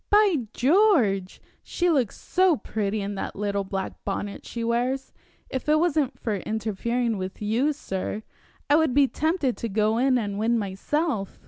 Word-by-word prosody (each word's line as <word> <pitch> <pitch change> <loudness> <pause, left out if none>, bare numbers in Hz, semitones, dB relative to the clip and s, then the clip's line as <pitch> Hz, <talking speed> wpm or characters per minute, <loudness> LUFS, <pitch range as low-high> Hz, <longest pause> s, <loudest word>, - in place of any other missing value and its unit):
By 395 - +4
George! 250 - +3 0.2
she 355 - -1
looks 260 -9 +1
so 365 -4 +3
pretty 210 -2 -2
in 200 +1 -3
that 195 - -5
little 200 0 -1
black 195 0 -5
bonnet 200 0 -4
she 235 - -4
wears, 245 +3 -1 0.3
if 260 +2 -4
it 305 - +5
wasn't 310 -5 +1
for 215 -4 -1
interfering 220 +2 -1
with 185 0 -5
you, 230 +8 +1
sir, 210 -6 -4 0.4
I 290 - +5
would 315 -6 +2
be 285 -1 +6
tempted 310 -3 0
to 230 - -3
go 215 +2 +1
in 260 0 +3
and 205 -3 -2
win 230 +2 +2
myself." 210 - -2
235 Hz, 160 wpm, -25 LUFS, 205-290 Hz, 0.4 s, be